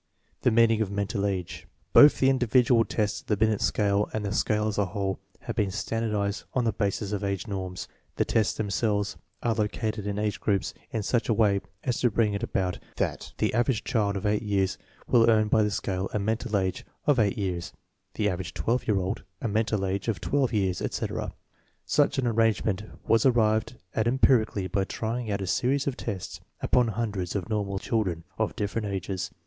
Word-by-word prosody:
The - - +4
meaning 115 -1 +4
of 105 - 0
mental 100 0 -1
age. 95 -3 -4 0.3
Both 145 0 +8
the 135 - +4
individual 120 -2 +3
tests 105 -1 -1
of - - -32
the 105 - +1
Binet 110 0 +2
scale 100 -1 +1
and 105 -1 -2
the 100 - -1
scale 105 0 +1
as 105 -1 -1
a 100 - +3
whole 95 0 -2 0.2
have 115 -3 -5
been 105 -4 +1
standardized 105 0 -2
on 125 - +2
the 115 - +2
basis 100 -1 -1
of 105 -1 -2
age 100 -1 -2
norms. 95 -4 -5 0.3
The - - +1
tests 110 -3 +1
themselves 105 0 0 0.3
are 115 - +2
located 105 -1 -2
in 100 0 -2
age 105 -1 -1
groups 100 -3 0 0.2
in 110 - -2
such 120 +3 0
a 115 - +3
way 100 -3 +3 0.2
as 125 -2 -1
to 120 - +3
bring 110 -1 +1
it 100 - -2
about 95 -6 -1 0.2
that - - -2
the - - +1
average 120 0 +1
child 100 -4 0
of 95 - -5
eight 105 0 +2
years 100 -3 0 0.3
will 115 -1 +4
earn 110 -1 +4
by 110 - +4
the 105 - +2
scale 95 -2 -2
a - - +1
"mental 110 +2 0
age" 95 -2 -1 0.2
of 145 -4 +4
eight 110 +2 +2
years, 90 -4 -2 0.4
the 105 - +1
average 95 -2 -3
twelve 120 +2 0
year 105 -3 +3
old 95 0 -2 0.2
a - - -2
"mental 105 -2 0
age" 95 +2 -2
of 110 -7 0
twelve 135 - +1
years, 95 -4 0
etc. - - -3 0.5
Such - - +2
an 135 - +1
arrangement 110 -3 +1 0.2
was 115 -1 +4
arrived 115 -2 +2 0.2
at 110 0 +1
empirically 120 -5 +3
by 95 +2 0
trying 115 +4 -3
out 100 -1 -1
a - - -2
series 135 +9 +1
of 140 - -1
tests 100 -8 -5 0.2
upon 125 -1 +3
hun 115 0 -1
dreds 95 -3 -4
of 100 +2 -3
normal 100 -2 -1
children 95 -6 -1 0.2
of - - 0
different 105 +1 -2
ages. 95 -2 -3
105 Hz, 200 wpm, -27 LUFS, 100-115 Hz, 0.5 s, Both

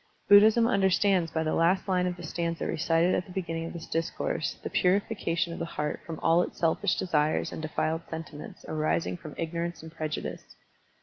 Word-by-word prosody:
Buddhism 215 +3 +7
understands 190 -4 +3
by 160 0 -1
the 155 - 0
last 175 +5 +2
line 180 -1 +2
of 180 - -2
the 175 - -9
stanza 170 -1 -2
recited 165 +3 +2
at 180 - -1
the - - -11
beginning 165 -3 -3
of - - -7
this 170 -2 -7
discourse 165 0 -2
the - - -3
purification 180 -3 +1
of - - -7
the - - -2
heart 150 0 -1
from 165 -2 -5
all 165 +2 +5
its - - -4
selfish 175 +3 +1
desires 155 -4 +1
and - - -6
defiled 160 +1 -1
sentiments 160 -2 -8
arising 155 +2 0
from 160 -4 -10
ignorance 170 +1 -3
and 160 - -9
prejudice. 155 -2 -5
170 Hz, 185 wpm, -28 LUFS, 160-180 Hz, -, Buddhism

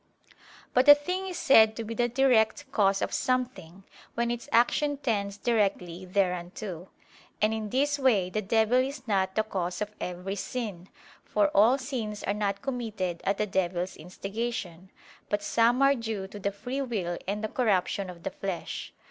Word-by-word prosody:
But 255 +3 +4
a 290 - +12
thing 365 +6 -3
is 365 - -5
said 220 -5 +6
to 230 - -4
be 225 +1 -5
the 240 +1 +1
direct 260 +2 +2
cause 195 -3 +2
of - - -3
something, 220 -9 -2 0.3
when 235 0 0
its 240 +3 -5
action 285 +5 +3
tends 205 -7 -1
directly 195 -6 0
thereunto. 180 0 -2 0.5
And 215 +1 +2
in 220 -1 -3
this 285 +5 +1
way 210 -9 +2
the 215 - -1
devil 220 +3 +3
is 260 -1 -3
not 190 -2 +1
the 220 - +2
cause 180 -4 -3
of 210 0 -3
every 180 +3 -4
sin: 200 -5 -5 0.3
for 205 -1 +2
all 220 +7 +5
sins 240 -6 -4
are 200 - 0
not 200 0 -2
committed 220 -10 -3
at 200 - +1
the 210 - +1
devil's 185 -2 -1
instigation, 190 0 -5 0.4
but 205 0 -1
some 235 +5 +3
are 275 0 +6
due 225 -6 -4
to 205 - -9
the 200 0 -1
free 245 +7 -4
will 195 -10 -2
and 205 +2 -2
the - - 0
corruption 200 -4 0
of 170 -1 -11
the - - -3
flesh. 190 -3 -5
215 Hz, 175 wpm, -28 LUFS, 190-245 Hz, 0.5 s, a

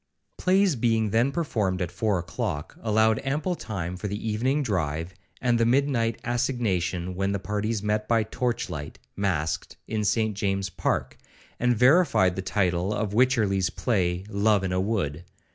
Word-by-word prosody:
Plays 190 -2 +3
being 115 -3 +1
then 120 +5 +3
performed 110 - -1
at 90 -2 -2
four 105 -4 0
o'clock, 80 -3 -4
allowed 110 0 +2
ample 150 +6 -1
time 90 - -4
for 100 +3 -4
the 100 +1 -3
evening 130 +7 +1
drive, 85 - -2 0.3
and 120 -2 +2
the - - +4
midnight 120 -3 +1
assignation, 95 -8 -1
when 95 +2 -1
the - - 0
parties 105 +2 -2
met 105 0 0
by 115 -1 +3
torch 120 +2 -2
light, 75 -1 -6 0.2
masked, 85 -6 -2
in 110 -1 -1
St 110 +1 +1
James's 95 -1 -1
park, - - -2 0.4
and 125 -1 +2
verified 125 - +4
the 95 - -2
title 95 0 0
of 105 -1 -2
Wycherly's 105 -7 +2
play, 90 -4 0
'Love 105 -1 +2
in 95 - -1
a 90 - +1
Wood.' 90 -7 -1
105 Hz, 160 wpm, -26 LUFS, 95-120 Hz, 0.4 s, the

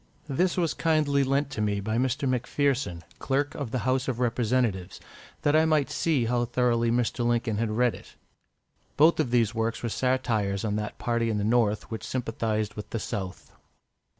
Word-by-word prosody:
This 175 +7 +1
was 170 -3 +1
kindly 150 -4 +2
lent 135 +1 0
to 105 - -3
me 105 -1 0
by 110 +3 -1
Mr. 130 +2 0
M'Pherson, 130 - 0 0.2
Clerk 140 +2 0
of 140 -5 -4
the 120 +1 -3
House 130 0 +1
of 125 -3 -2
Representatives, 115 -6 0 0.4
that 145 +1 +3
I 155 - +5
might 155 -3 +2
see 150 -8 +1
how 120 +1 +1
thoroughly 120 -1 +1
Mr. 120 +1 0
Lincoln 120 -2 0
had 115 -1 0
read 120 +2 +2
it. - - -13 0.8
Both 160 +3 +5
of 150 -6 +1
these 120 -2 +2
works 115 +1 -2
were 120 - -1
satires 110 -6 0
on 105 -1 -1
that 105 0 -4
party 115 -1 0
in 110 - 0
the 105 - -1
North 110 -1 +1
which 110 - -5
sympathised 115 -4 -2
with 105 - -8
the - - -3
South. 95 -5 -5
120 Hz, 180 wpm, -27 LUFS, 110-135 Hz, 0.8 s, I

